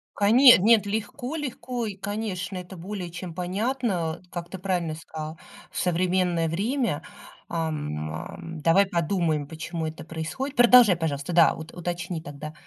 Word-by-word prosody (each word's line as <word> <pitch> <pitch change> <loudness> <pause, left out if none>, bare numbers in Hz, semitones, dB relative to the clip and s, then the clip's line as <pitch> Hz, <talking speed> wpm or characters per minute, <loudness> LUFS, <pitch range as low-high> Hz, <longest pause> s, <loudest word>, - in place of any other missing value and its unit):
Коне 240 +5 +8
нет, 215 +2 +5
легко 220 +7 -3
легко, 250 -4 -4
и, 205 -3 -4
конечно, 195 -3 -4
это 180 +1 -8
более 185 0 -5
чем 170 -1 -7
понятно. 185 -2 -1
Как 175 -1 -6
ты 190 - -6
правильно 180 -4 -1
сказала, 155 0 -7 0.3
в - - -9
современное 180 -1 +1
время, 205 - -1 0.5
ам, 150 - -3
ам, 165 - -7
давай 180 +5 +5
подумаем, 170 -5 0
почему 160 +1 -4
это 155 0 -7
происходит. 170 - -5
Продолжай, 245 -5 +8
пожалуйста, 155 0 -2
да, 170 -1 +6
вот 160 +1 -9
уточни 175 -1 -4
тогда. 150 +1 -8
175 Hz, 140 wpm, -26 LUFS, 160-205 Hz, 0.5 s, Коне